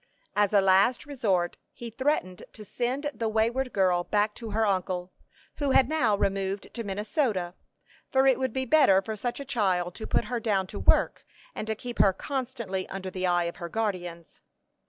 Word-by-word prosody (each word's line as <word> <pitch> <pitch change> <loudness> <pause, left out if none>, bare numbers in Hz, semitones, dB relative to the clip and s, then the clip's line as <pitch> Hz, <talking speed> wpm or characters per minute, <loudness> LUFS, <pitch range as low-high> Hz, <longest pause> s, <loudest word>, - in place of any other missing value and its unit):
As 205 -1 +3
a 205 -2 +5
last 195 +7 +3
resort, 200 -12 0 0.2
he 235 -1 -8
threatened 230 - -1
to 215 - -10
send 260 +7 -2
the 225 -3 -2
wayward 235 +4 0
girl 180 -3 +2
back 210 +2 +1
to 230 0 -8
her 220 +1 +1
uncle, 185 -2 -1 0.5
who 285 -2 0
had 265 -1 +5
now 255 -9 +2
removed 195 0 -2
to 235 - -4
Minnesota; 205 - -1 0.6
for 265 0 +3
it 265 -1 +4
would 260 -2 0
be 260 +2 -2
better 255 -8 +5
for 220 +1 -4
such 240 +5 -3
a 280 - -6
child 185 -8 0
to 220 - -7
put - - +1
her 240 +2 -2
down 205 -4 0
to - - -7
hard - - -8
work, - - +3 0.3
and 215 - -5
to 220 - -1
keep 245 +2 -8
her 195 - +5
constantly 235 -6 -4
under 190 -1 -5
the 185 0 -2
eye 175 -1 +2
of 170 0 -4
her 170 - -6
guardians. 175 -6 -4
210 Hz, 195 wpm, -27 LUFS, 190-245 Hz, 0.6 s, a